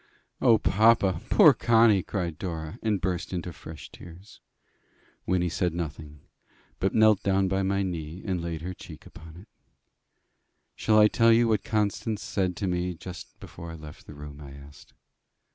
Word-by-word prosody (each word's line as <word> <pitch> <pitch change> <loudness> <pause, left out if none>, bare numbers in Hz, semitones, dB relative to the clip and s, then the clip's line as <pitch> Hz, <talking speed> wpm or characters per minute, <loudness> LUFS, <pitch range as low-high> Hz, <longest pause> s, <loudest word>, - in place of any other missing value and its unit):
"O, 115 - +5
papa! 105 -4 +3
poor - - +7
Connie!" 115 -3 +4
cried 85 -5 -4
Dora, 80 -4 -6
and 105 -3 0
burst 90 0 -3
into 90 -1 -4
fresh 80 -4 -11
tears. 90 +4 -14 0.9
Wynnie 90 -1 +1
said 85 0 -1
nothing, 75 -3 -6 0.6
but 95 - -1
knelt 110 -2 +5
down 95 -1 +1
by 95 +1 0
my 100 +1 0
knee, 85 -1 -5
and 95 -4 -2
laid 85 -1 -5
her 90 +1 -4
cheek - - -12
upon 80 0 -13
it. 95 - -14 1.3
"Shall 110 -1 +2
I 105 0 +7
tell 115 +2 +3
you 115 +1 +4
what 110 -4 +1
Constance 105 0 -2
said 95 -3 -2
to 100 - -3
me 90 0 -2
just 90 +2 -10
before 85 - -10
I 80 - -8
left 75 -2 -12
the - - -11
room?" 75 0 -10
I 70 -2 -10
asked. 70 +1 -15
90 Hz, 165 wpm, -26 LUFS, 80-105 Hz, 1.3 s, poor